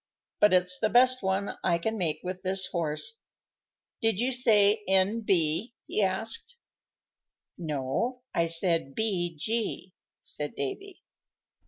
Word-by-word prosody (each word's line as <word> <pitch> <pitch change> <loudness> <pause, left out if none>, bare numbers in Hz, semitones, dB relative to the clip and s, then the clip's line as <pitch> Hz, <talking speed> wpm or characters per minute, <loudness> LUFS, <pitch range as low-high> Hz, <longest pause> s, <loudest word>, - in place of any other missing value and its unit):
"But 210 - +5
it's 180 0 +3
the 215 - +1
best 255 +2 +5
one 190 +1 -2
I 170 -2 +2
can 220 +6 -2
make 160 -6 -1
with 185 0 -5
this 190 0 +2
horse. 170 - -2 0.8
Did 225 -3 +1
you 250 +3 +1
say 215 -4 +4
N.B.?" 190 0 +1
he - - -1
asked. 205 - -1 1.0
"No, 160 - -3
I 170 - +1
said 165 -4 0
B.G.," 190 0 -2 0.3
said 150 0 -5
Davy. 365 - -6
190 Hz, 120 wpm, -28 LUFS, 170-225 Hz, 1.0 s, But